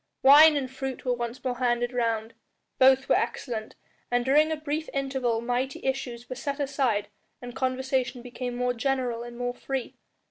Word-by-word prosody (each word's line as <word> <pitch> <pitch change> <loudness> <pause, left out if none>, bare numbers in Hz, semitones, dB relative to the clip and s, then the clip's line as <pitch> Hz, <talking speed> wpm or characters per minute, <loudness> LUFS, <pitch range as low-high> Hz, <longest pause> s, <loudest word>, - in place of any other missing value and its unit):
Wine 295 +3 +8
and 270 -2 -2
fruit 265 0 -5
were 250 - +2
once 240 0 -5
more 250 -2 -2
handed 245 0 +1
round; 230 -2 -1 0.5
both 265 0 +5
were - - +4
excellent, 220 -4 -2 0.3
and 245 0 +1
during 300 +4 +4
a - - +1
brief 310 +1 -3
interval 265 -4 0
mighty 250 +3 -2
issues 250 -3 -3
were 255 - -5
set 280 +2 -4
aside 265 -8 0 0.3
and 245 0 -9
conversation 260 -1 -1
became 245 0 -5
more 250 0 0
general 245 -1 -1
and 240 0 -8
more 245 0 -2
free. 265 0 -4
255 Hz, 170 wpm, -27 LUFS, 240-270 Hz, 0.5 s, Wine